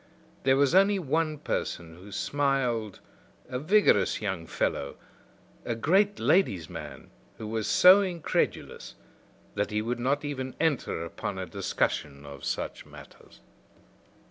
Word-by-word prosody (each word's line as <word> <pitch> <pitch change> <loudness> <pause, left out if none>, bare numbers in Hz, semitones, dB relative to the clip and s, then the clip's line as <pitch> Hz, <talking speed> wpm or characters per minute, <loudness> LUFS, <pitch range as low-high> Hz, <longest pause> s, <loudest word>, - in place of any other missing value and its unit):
There 135 0 +4
was 140 +2 +3
only 195 +2 +5
one 155 -1 -1
person 85 - -4
who 95 +3 -13
smiled, 125 -4 -1 0.5
a 125 0 -4
vigorous 155 - +3
young 95 -6 -4
fellow, 70 - -2 0.7
a 120 - -2
great 195 - +2
ladies' 100 - +2
man 80 -4 -9 0.3
who 110 - -7
was 110 0 -2
so 185 +3 +7
incredulous 175 -5 -2 0.6
that 105 0 -1
he 105 0 -1
would 120 +2 -2
not 140 +4 0
even 130 -3 -4
enter 145 - 0
upon 95 +3 -5
a 95 - -3
discussion 75 -5 -2
of 70 -2 -10
such - - -3
matters. - - -16
125 Hz, 130 wpm, -28 LUFS, 95-155 Hz, 0.7 s, so